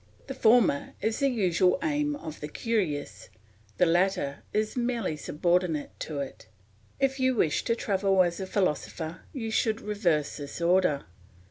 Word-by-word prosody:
The 270 Hz, -, -5 dB
former 225 Hz, -, +3 dB
is 220 Hz, +2 st, -1 dB
the 275 Hz, -1 st, +3 dB
usual 185 Hz, -6 st, +2 dB
aim 295 Hz, -1 st, 0 dB
of 160 Hz, -, -8 dB
the 150 Hz, -, -5 dB
curious, 150 Hz, -, -2 dB, 0.5 s
the 180 Hz, -, +5 dB
latter 175 Hz, -4 st, +1 dB
is 215 Hz, 0 st, -1 dB
merely 240 Hz, -8 st, -1 dB
subordinate 165 Hz, +1 st, 0 dB
to 155 Hz, -, -5 dB
it. 135 Hz, -5 st, -8 dB, 0.5 s
If 270 Hz, 0 st, +1 dB
you 260 Hz, 0 st, +2 dB
wish 155 Hz, -9 st, +1 dB
to 230 Hz, -, +2 dB
travel 195 Hz, -3 st, +2 dB
as 175 Hz, +1 st, -2 dB
a 190 Hz, -, -4 dB
philosopher 165 Hz, -3 st, -2 dB
you 225 Hz, -6 st, -4 dB
should 220 Hz, 0 st, +1 dB
reverse 175 Hz, -9 st, 0 dB
this 145 Hz, +1 st, -7 dB
order. 170 Hz, -4 st, +2 dB
190 Hz, 150 wpm, -28 LUFS, 160-230 Hz, 0.5 s, the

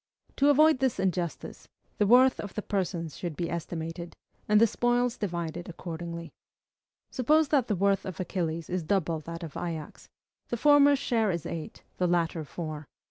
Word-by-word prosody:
To 280 Hz, +1 st, +4 dB
avoid 305 Hz, 0 st, +5 dB
this 260 Hz, -6 st, 0 dB
injustice, 180 Hz, -3 st, -3 dB, 0.3 s
the 205 Hz, -, +3 dB
worth 255 Hz, +3 st, +6 dB
of 205 Hz, -, -6 dB
the 210 Hz, -, -3 dB
persons 175 Hz, -6 st, -2 dB
should 170 Hz, -4 st, -4 dB
be 170 Hz, +1 st, -3 dB
estimated, 170 Hz, 0 st, -5 dB, 0.3 s
and 210 Hz, 0 st, +6 dB
the 230 Hz, -, +7 dB
spoils 240 Hz, +2 st, +1 dB
divided 175 Hz, -3 st, -4 dB
accordingly. 170 Hz, -1 st, -6 dB, 0.8 s
Suppose 300 Hz, +4 st, +3 dB
that 270 Hz, -5 st, +2 dB
the 210 Hz, -, 0 dB
worth 195 Hz, +1 st, +2 dB
of 185 Hz, -3 st, -7 dB
Achilles 170 Hz, -3 st, -2 dB
is 180 Hz, 0 st, -2 dB
double 165 Hz, -1 st, 0 dB
that 165 Hz, +2 st, -8 dB
of 160 Hz, -4 st, -8 dB
Ajax: 165 Hz, -3 st, -6 dB, 0.4 s
the 240 Hz, -, -1 dB
former's 285 Hz, +1 st, +6 dB
share 230 Hz, -5 st, +1 dB
is 170 Hz, -4 st, -2 dB
eight, 160 Hz, -2 st, -6 dB
the 180 Hz, -, +1 dB
latter 170 Hz, -2 st, 0 dB
four. 155 Hz, -1 st, -6 dB
180 Hz, 165 wpm, -28 LUFS, 170-230 Hz, 0.8 s, the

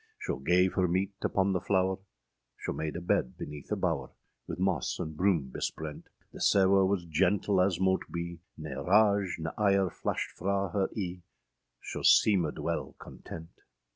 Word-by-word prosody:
Scho -, -, -3 dB
gav 90 Hz, +7 st, +3 dB
her 90 Hz, -1 st, +2 dB
meete 95 Hz, +3 st, 0 dB
upon 95 Hz, 0 st, +1 dB
the 90 Hz, -, 0 dB
flower; 95 Hz, -1 st, +1 dB, 0.6 s
[Scho -, -, -4 dB
made 80 Hz, -1 st, -3 dB
a 90 Hz, -, -4 dB
bed 60 Hz, -7 st, 0 dB
beneath 75 Hz, -1 st, -8 dB
a -, -, +2 dB
bower, -, -, -1 dB, 0.4 s
With -, -, -5 dB
moss 95 Hz, -5 st, 0 dB
and 80 Hz, 0 st, -5 dB
broom 85 Hz, -7 st, +1 dB
besprent; 75 Hz, +3 st, -5 dB, 0.2 s
The -, -, -9 dB
sewe 95 Hz, 0 st, +5 dB
was 95 Hz, -3 st, 0 dB
gentle 95 Hz, +4 st, +2 dB
as 90 Hz, -2 st, +1 dB
mote 95 Hz, 0 st, +2 dB
be, 85 Hz, 0 st, -4 dB, 0.2 s
Ne 75 Hz, -2 st, -6 dB
rage 100 Hz, +3 st, +3 dB
ne 80 Hz, 0 st, -4 dB
ire 100 Hz, -3 st, +3 dB
flashed -, -, -3 dB
fra 100 Hz, +1 st, -1 dB
her 95 Hz, -2 st, +2 dB
eâe, 90 Hz, -3 st, -3 dB, 0.6 s
Scho -, -, -5 dB
seemèd 90 Hz, -8 st, +4 dB
wele -, -, -3 dB
content. 80 Hz, 0 st, -11 dB
90 Hz, 165 wpm, -30 LUFS, 80-95 Hz, 0.6 s, sewe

